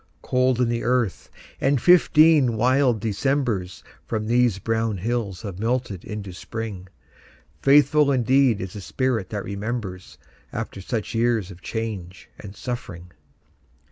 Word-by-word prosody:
Cold 130 Hz, -1 st, +1 dB
in 125 Hz, -, +3 dB
the 120 Hz, 0 st, -1 dB
earth, 120 Hz, -5 st, 0 dB, 0.3 s
and 135 Hz, 0 st, +2 dB
fifteen 155 Hz, -6 st, +5 dB
wild 125 Hz, 0 st, +3 dB
Decembers 110 Hz, -3 st, -1 dB, 0.2 s
From 110 Hz, -2 st, -2 dB
these 120 Hz, -2 st, +2 dB
brown 115 Hz, +1 st, -1 dB
hills 110 Hz, -1 st, -3 dB
have 100 Hz, -4 st, -6 dB
melted 115 Hz, -5 st, -2 dB
into 100 Hz, -3 st, -6 dB
Spring. 100 Hz, 0 st, -6 dB, 0.7 s
Faithful 145 Hz, +1 st, +5 dB
indeed 130 Hz, -2 st, +3 dB
is 95 Hz, -1 st, -6 dB
the 105 Hz, -, -7 dB
spirit 120 Hz, -1 st, -1 dB
that 105 Hz, -2 st, -4 dB
remembers 100 Hz, -2 st, -5 dB, 0.3 s
After 95 Hz, -, -5 dB
such 110 Hz, +2 st, -4 dB
years 115 Hz, -4 st, +1 dB
of 90 Hz, 0 st, -13 dB
change 100 Hz, -6 st, -6 dB
and 100 Hz, -1 st, -10 dB
suffering! 90 Hz, -9 st, -6 dB
115 Hz, 130 wpm, -23 LUFS, 100-125 Hz, 0.7 s, fifteen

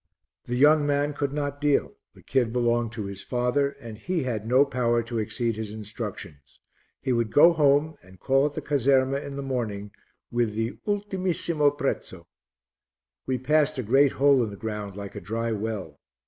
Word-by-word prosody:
The 120 Hz, -, -3 dB
young 145 Hz, +3 st, +5 dB
man 145 Hz, +1 st, +1 dB
could 140 Hz, -1 st, -2 dB
not 145 Hz, 0 st, -3 dB
deal; 145 Hz, -1 st, +1 dB, 0.2 s
the -, -, -17 dB
kid 125 Hz, -4 st, +1 dB
belonged 120 Hz, -1 st, +1 dB
to 110 Hz, -3 st, -4 dB
his 100 Hz, 0 st, -6 dB
father, 125 Hz, +3 st, 0 dB
and 110 Hz, -2 st, -9 dB
he 175 Hz, +3 st, -2 dB
had 110 Hz, -4 st, -3 dB
no 130 Hz, +4 st, +5 dB
power 120 Hz, -3 st, 0 dB
to 115 Hz, 0 st, -4 dB
exceed 115 Hz, +1 st, -1 dB
his 110 Hz, -2 st, -5 dB
instructions; 105 Hz, -, -8 dB, 0.4 s
he 130 Hz, -1 st, +1 dB
would 115 Hz, -2 st, 0 dB
go 170 Hz, +4 st, +7 dB
home 150 Hz, 0 st, +3 dB
and 95 Hz, 0 st, -18 dB
call 135 Hz, +2 st, +3 dB
at 145 Hz, -, -8 dB
the -, -, -4 dB
caserma 135 Hz, -1 st, +2 dB
in 140 Hz, -, -7 dB
the 140 Hz, -, -4 dB
morning 110 Hz, -6 st, -3 dB, 0.4 s
with 120 Hz, -3 st, 0 dB
the 115 Hz, +3 st, -3 dB
ultimissimo 185 Hz, -7 st, +1 dB
prezzo. 95 Hz, -10 st, -3 dB, 1.0 s
We 130 Hz, -1 st, 0 dB
passed 150 Hz, +3 st, +2 dB
a 130 Hz, -, -2 dB
great 135 Hz, +5 st, +4 dB
hole 140 Hz, -2 st, +4 dB
in 110 Hz, -, -3 dB
the 100 Hz, -, -9 dB
ground 105 Hz, -3 st, -5 dB
like 100 Hz, -1 st, -7 dB
a -, -, -7 dB
dry 115 Hz, +2 st, -2 dB
well. 105 Hz, -8 st, -4 dB
125 Hz, 180 wpm, -26 LUFS, 110-145 Hz, 1.0 s, go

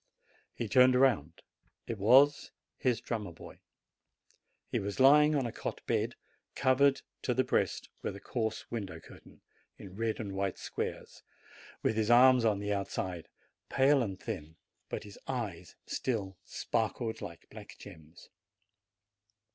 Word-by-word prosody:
He 115 Hz, -, -3 dB
turned 125 Hz, +4 st, +6 dB
round. 110 Hz, -, +2 dB, 0.4 s
It 115 Hz, -3 st, -5 dB
was 135 Hz, +8 st, +5 dB, 0.3 s
his 120 Hz, -3 st, 0 dB
drummer 110 Hz, -7 st, -4 dB
boy. 85 Hz, -, -13 dB, 1.1 s
He -, -, -1 dB
was 100 Hz, +3 st, -4 dB
lying 150 Hz, +3 st, +6 dB
on 135 Hz, -3 st, +1 dB
a 120 Hz, -, -3 dB
cot -, -, -6 dB
bed, -, -, 0 dB, 0.4 s
covered 135 Hz, +1 st, +3 dB, 0.2 s
to -, -, -1 dB
the -, -, +3 dB
breast -, -, 0 dB
with -, -, -4 dB
a -, -, -8 dB
coarse 110 Hz, +1 st, -3 dB
window 95 Hz, -8 st, -5 dB
curtain, -, -, -16 dB, 0.4 s
in 95 Hz, -1 st, -11 dB
red 115 Hz, +1 st, -2 dB
and 105 Hz, -4 st, -4 dB
white 95 Hz, -1 st, -2 dB
squares, -, -, -5 dB, 0.6 s
with 110 Hz, -, +1 dB
his 110 Hz, 0 st, +1 dB
arms 125 Hz, 0 st, +7 dB
on 105 Hz, -3 st, +3 dB
the 105 Hz, +1 st, -2 dB
outside, 95 Hz, -3 st, -3 dB, 0.4 s
pale 135 Hz, +1 st, +4 dB
and 95 Hz, -5 st, -3 dB
thin, 80 Hz, -8 st, -6 dB, 0.3 s
but -, -, -4 dB
his 105 Hz, -1 st, -12 dB
eyes 100 Hz, -9 st, -4 dB
still 100 Hz, -7 st, -2 dB
sparkled 115 Hz, 0 st, -2 dB
like 85 Hz, -5 st, -9 dB
black 105 Hz, -1 st, -11 dB
gems. 80 Hz, -4 st, -14 dB
110 Hz, 140 wpm, -31 LUFS, 95-125 Hz, 1.1 s, arms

